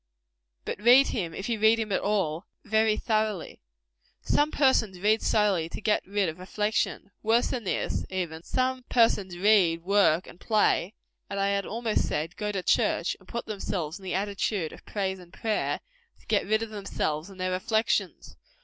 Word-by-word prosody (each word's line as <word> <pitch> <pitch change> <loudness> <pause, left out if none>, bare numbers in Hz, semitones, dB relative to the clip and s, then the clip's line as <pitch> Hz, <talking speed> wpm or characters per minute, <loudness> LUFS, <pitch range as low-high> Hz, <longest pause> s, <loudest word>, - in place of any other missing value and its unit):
But - - -4
read 250 +5 +7
him, 170 -7 -3
if 195 - -5
you 230 -2 -1
read 220 +1 +5
him 220 -2 -3
at - - +1
all, 190 -4 -1 0.2
very 220 0 +2
thoroughly. 215 -5 -1 0.6
Some 295 +1 +2
persons 250 -11 +2
read 215 +3 +2
solely 200 -7 +2
to - - -7
get 210 0 +1
rid 200 -1 0
of 160 +1 -5
reflection. 210 +1 -2
Worse 225 +2 +2
than 240 -4 -3
this, - - -1
even; 175 -4 -3
some 255 +6 -1
persons 205 -6 +2
read, 180 -4 +3
work 190 -3 +3
and 175 - -14
play 215 -2 +1 0.3
and 200 - -3
I 195 0 +2
had 200 0 -1
almost 225 -1 -1
said, 160 +4 -3
go 210 -1 -3
to 190 -3 -3
church, - - +1
and - - -22
put 235 - -4
themselves 185 -5 -4
in - - -16
the 185 - -3
attitude 200 -3 -1
of - - -13
prayer 190 -2 -2
and 175 -1 -16
praise 215 +2 -1 0.4
to - - -24
get 205 -3 +1
rid 220 +2 +2
of 225 - -7
themselves 175 -6 -3
and 190 -1 -13
their 185 0 -1
reflections. 220 +5 -1
205 Hz, 180 wpm, -27 LUFS, 185-220 Hz, 0.6 s, read